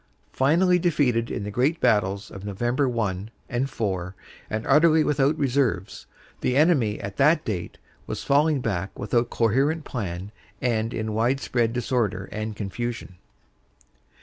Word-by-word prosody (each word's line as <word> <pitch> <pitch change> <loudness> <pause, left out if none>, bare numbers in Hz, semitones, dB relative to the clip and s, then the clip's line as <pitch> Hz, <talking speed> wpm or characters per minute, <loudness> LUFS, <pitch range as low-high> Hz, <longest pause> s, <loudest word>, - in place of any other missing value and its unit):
Finally 175 +7 +3
defeated 140 -9 +1
in 100 - -3
the 105 - -4
great 135 +10 +1
battles 100 -1 +1
of 95 - -9
Nov. 100 -2 -6
1 120 -6 0 0.2
and 130 +3 -1
4, 95 -7 -3 0.3
and 110 +1 -3
utterly 155 +2 +5
without 145 +1 +2
reserves, 125 - -1 0.3
the 125 - 0
enemy 140 -10 +3
at 100 0 -6
that 150 +3 +4
date 90 -6 -4 0.3
was - - -4
falling 145 0 +3
back 100 -5 -3
without 120 +3 0
coherent 135 +8 +1
plan 95 -4 -5 0.3
and 115 -2 0
in 110 -2 -3
wide 120 +5 +1
spread 120 -3 0
disorder 115 -6 -1
and 110 0 -4
confusion." 105 -1 -5
120 Hz, 140 wpm, -25 LUFS, 105-140 Hz, 0.3 s, utterly